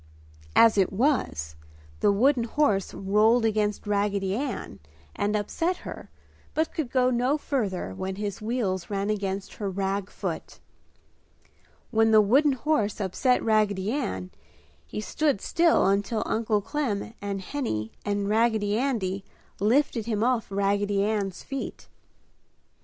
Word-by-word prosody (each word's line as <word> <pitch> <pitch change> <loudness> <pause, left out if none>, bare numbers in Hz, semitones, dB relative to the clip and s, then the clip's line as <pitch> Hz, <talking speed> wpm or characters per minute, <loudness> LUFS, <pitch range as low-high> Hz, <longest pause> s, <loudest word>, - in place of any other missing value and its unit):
As 225 -3 +6
it 190 - +3
was, 190 - 0 0.4
the - - +4
wooden 240 +4 +3
horse 220 -7 +1
rolled 215 +4 +3
against 210 -1 0
Raggedy 200 -1 0
Ann 280 +6 -4 0.4
and 205 +1 0
upset 330 - -1
her - - -8 0.5
but 315 +1 0
could 305 -6 -2
go 255 0 +2
no 250 +4 +2
further 205 - -2
when 190 - -4
his 205 0 -4
wheels 215 -6 -2
ran 200 0 -1
against 195 -2 -3
her 200 - -1
rag 195 +1 -2
foot. - - -5 1.3
When 225 -1 +4
the 220 -1 +7
wooden 270 +8 +4
horse 245 -7 0
upset 210 +6 +1
Raggedy 210 -2 +2
Ann, 95 - -3 0.6
he 210 - -5
stood 280 +4 0
still 335 - +3
until 205 +3 +1
Uncle 215 -2 0
Clem 225 -5 -2
and 200 -1 -3
Henny 185 - -3
and 205 -1 -1
Raggedy 220 -1 +2
Andy 200 -8 -1 0.4
lifted 230 +1 +2
him 215 -2 0
off 245 -2 +1
Raggedy 200 0 +1
Ann's 200 -3 -2
feet. 275 -1 -6
210 Hz, 130 wpm, -26 LUFS, 200-245 Hz, 1.3 s, the